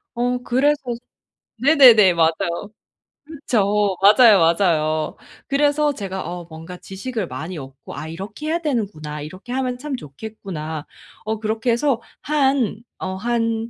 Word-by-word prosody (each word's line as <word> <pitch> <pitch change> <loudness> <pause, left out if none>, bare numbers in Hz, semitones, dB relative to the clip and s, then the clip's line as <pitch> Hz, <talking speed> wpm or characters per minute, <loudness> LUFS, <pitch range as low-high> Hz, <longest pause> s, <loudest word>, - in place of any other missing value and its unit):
어 245 +1 0
그래서 285 +5 +2 0.8
네네네. 250 - +7
맞아요. 170 +3 0 0.6
그쵸. 210 -10 0
맞아요, 210 0 +7
맞아요. 165 -2 +2 0.3
그래서 290 +1 +2
제가 190 -5 -5
어 175 0 -6
뭔가 165 +3 -9
지식을 200 +2 -5
많이 160 +7 -6
얻고 135 -2 -10
'아 155 - -6
이렇게 205 - -7
해야 330 +2 0
되는구나, 200 - -3
이렇게 185 - -8
하면 255 -1 -1
참 280 +2 -4
좋겠구나.' 160 - -7 0.4
어 220 0 -2
그렇게 220 +2 -1
해서 240 0 +1 0.2
한, 270 -7 +1 0.2
어 185 0 -4
한 230 +1 -1
215 Hz, 270 characters per minute, -21 LUFS, 170-255 Hz, 0.8 s, 네네네